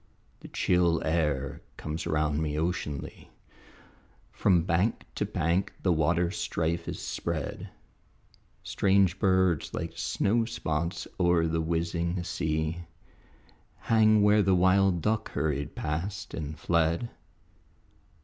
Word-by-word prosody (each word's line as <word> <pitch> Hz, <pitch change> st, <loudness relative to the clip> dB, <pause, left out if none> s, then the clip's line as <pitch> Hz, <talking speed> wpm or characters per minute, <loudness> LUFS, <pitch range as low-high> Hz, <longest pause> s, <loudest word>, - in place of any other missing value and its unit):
The -, -, -11 dB
chill 85 Hz, -2 st, +2 dB
air 75 Hz, -4 st, -1 dB, 0.2 s
comes 80 Hz, +1 st, -4 dB
around 75 Hz, 0 st, 0 dB
me 75 Hz, -1 st, -2 dB
oceanly, 80 Hz, -4 st, -3 dB, 1.0 s
From 90 Hz, -4 st, +3 dB
bank 90 Hz, +5 st, 0 dB
to -, -, -1 dB
bank 85 Hz, +4 st, 0 dB
the 90 Hz, -, +3 dB
waterstrife 85 Hz, 0 st, 0 dB
is -, -, -4 dB
spread; 80 Hz, -5 st, -4 dB, 0.9 s
Strange 95 Hz, -2 st, +2 dB
birds 95 Hz, -5 st, +2 dB
like 80 Hz, -, -3 dB
snowspots 85 Hz, -3 st, -1 dB
oer 85 Hz, -2 st, +3 dB
the 80 Hz, 0 st, 0 dB
whizzing 85 Hz, +2 st, -1 dB
sea 80 Hz, -1 st, -2 dB, 1.0 s
Hang 110 Hz, -2 st, +4 dB
where 105 Hz, +1 st, +5 dB
the 95 Hz, -1 st, +3 dB
wild 95 Hz, 0 st, +3 dB
duck 110 Hz, 0 st, 0 dB
hurried 70 Hz, -2 st, -2 dB
past 95 Hz, +7 st, -4 dB
and 75 Hz, -1 st, -5 dB
fled. 85 Hz, +8 st, 0 dB
85 Hz, 105 wpm, -28 LUFS, 80-95 Hz, 1.0 s, where